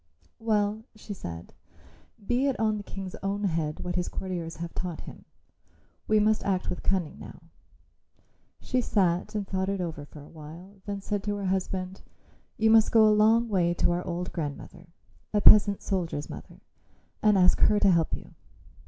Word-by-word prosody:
"Well," 215 -1 0
she 215 -1 -8
said. 85 - -8 0.7
"Be 245 +5 +1
it 270 - -1
on 215 -1 +1
the 205 - -6
King's 195 -2 -7
own 200 +1 -2
head 160 -5 -1
what 175 - -3
his 180 0 -1
courtiers 175 -4 -5
have 170 0 -6
taught 175 -3 -5
him. - - -12 0.8
We 215 0 +4
must 215 +1 +2
act 190 -2 -1
with 180 - -5
cunning 185 -6 -1
now." - - -11 1.2
She 255 - -1
sat 185 -3 0
and 205 -2 -2
thought 190 0 -1
it 200 -1 -2
over 165 -4 -4
for 145 0 -13
a - - -14
while; 170 +6 -12
then 200 -1 -4
said 205 0 -2
to 205 -1 -1
her 200 -1 -4
husband, 185 0 -2 0.6
"You 220 0 +3
must 220 -1 +5
go 220 -1 +6
a 215 - +5
long 220 +3 +4
way 175 -5 +1
to 175 - +2
our 175 +1 -1
old 180 0 -4
grandmother, 165 +2 -6 0.5
a - - +4
peasant 205 -1 +6
soldier's 170 -6 -3
mother, - - -11 0.6
and 210 -2 +4
ask 180 -1 +4
her 210 -1 +4
to 200 - +5
help 165 -2 +2
you. - - -15
190 Hz, 180 wpm, -27 LUFS, 175-210 Hz, 1.2 s, go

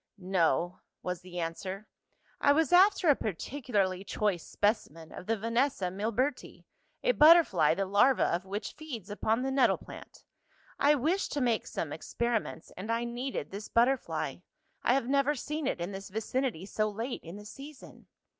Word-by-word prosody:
"No," 180 -3 0 0.2
was 180 -1 -3
the 180 -1 -7
answer. 185 +5 -4 0.5
"I 285 - +5
was 320 +3 +2
after 380 0 +6
a 290 - +7
particularly 200 - -2
choice 200 -4 -1
specimen 165 -7 -1
of - - -9
the 225 0 +1
Vanessa 230 -3 0
milberti, 230 +8 -2 0.4
a - - +4
butterfly 300 - +6
the 195 - -1
larva 205 +7 +4
of 175 +2 0
which 200 +2 -5
feeds 245 - -8
upon 220 +3 0
the 265 - -1
nettle 270 0 +3
plant. - - -12 0.6
I 290 +1 +5
wished 320 +9 0
to 290 - -1
make 240 -3 +1
some - - -4
experiments, 235 -8 -3
and 205 +5 -5
I 230 +1 0
needed 240 +3 -4
this 200 +2 -6
butterfly. 245 +3 +1 0.4
I - - +3
have 270 -3 0
never 280 +2 +2
seen 300 +2 -3
it - - -1
in 175 +3 -3
this 195 0 -7
vicinity 220 -2 -2
so 215 +1 -1
late 225 +5 -4
in 165 +2 -9
the 205 0 -10
season." 275 +5 -12
225 Hz, 165 wpm, -30 LUFS, 190-270 Hz, 0.6 s, a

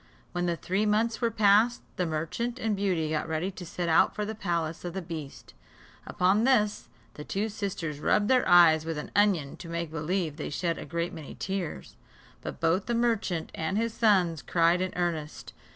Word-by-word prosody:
When 175 0 -1
the 170 - 0
three 195 +5 -1
months 225 +3 +1
were 235 - +2
past, 215 +2 +3
the 180 - -1
merchant 165 +10 -3
and 220 -4 -1
Beauty 180 -6 0
got 155 - -1
ready 160 +4 -2
to 185 - -9
set 175 0 -4
out 160 - +4
for 210 - -2
the 220 - -4
palace 170 -6 -2
of 175 0 -5
the 190 - -2
beast. 160 -5 -8 0.5
Upon 190 +4 +2
this, 220 -5 +2 0.2
the 150 - -8
two 205 +7 -2
sisters 180 -8 -4
rubbed 205 +6 +2
their 255 +1 +3
eyes 165 -3 +7
with 165 -1 -4
an 150 - -6
onion, 190 -9 +2
to 170 - -9
make 170 -1 -3
believe 165 0 -2
they 155 - -4
shed 165 +2 -2
a - - -7
great 170 +1 -2
many 160 -4 -9
tears; 190 - -5 0.4
but - - -7
both 165 +5 +1
the 240 - 0
merchant 220 -8 0
and 160 +5 -2
his 230 0 0
sons 185 -9 +2
cried 170 +1 +2
in 185 0 -1
earnest. 165 -4 -3
180 Hz, 195 wpm, -28 LUFS, 165-210 Hz, 0.5 s, eyes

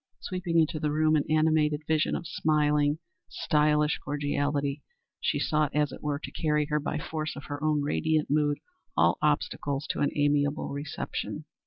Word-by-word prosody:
Sweeping 180 -3 -2
into 160 -1 +2
the 150 -1 0
room, 155 +1 +3
an 150 - +2
animated 155 -1 +2
vision 155 0 +2
of 170 - -4
smiling, 150 -2 +2 0.3
stylish 150 0 +2
cordiality, 145 0 -1 0.4
she - - 0
sought, 150 -2 +1
as 150 -1 +2
it - - -9
were, 145 -1 -1
to 145 - -8
carry 150 -1 +1
before 150 0 -2
her - - +1
by 150 +1 -2
force 155 +1 -4
of 140 - -8
her 145 0 -6
own 150 -2 +2
radiant 155 +1 +1
mood 145 0 +2 0.4
all - - +4
obstacles 140 0 0
to - - -5
an 145 - +2
amiable 145 0 +1
reception. 140 0 -4
150 Hz, 170 wpm, -28 LUFS, 145-155 Hz, 0.4 s, all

